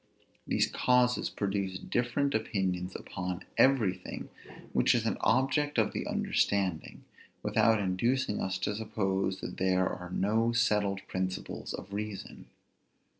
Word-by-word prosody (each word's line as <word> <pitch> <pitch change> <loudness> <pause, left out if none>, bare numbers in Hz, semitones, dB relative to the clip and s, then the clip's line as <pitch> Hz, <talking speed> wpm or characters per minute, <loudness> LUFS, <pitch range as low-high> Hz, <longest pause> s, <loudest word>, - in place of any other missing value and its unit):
These - - +3
causes 125 0 +3
produce 100 -2 -2
different 125 +6 0
opinions 95 -4 -1
upon 90 +1 -5
everything 120 -9 +2 0.4
which - - +4
is - - 0
an - - 0
object 140 +2 +2
of 110 - +3
the - - -3
understanding, 95 -5 0 0.4
without 110 +1 +3
inducing 105 +5 0
us 95 0 -1
to 105 - -1
suppose 95 -3 -1
that - - -6
there 95 0 +2
are 90 0 -5
no 110 +5 +1
settled 105 -4 +2
principles 95 0 -3
of 100 - -9
reason. 105 -1 -6
100 Hz, 125 wpm, -30 LUFS, 95-115 Hz, 0.4 s, which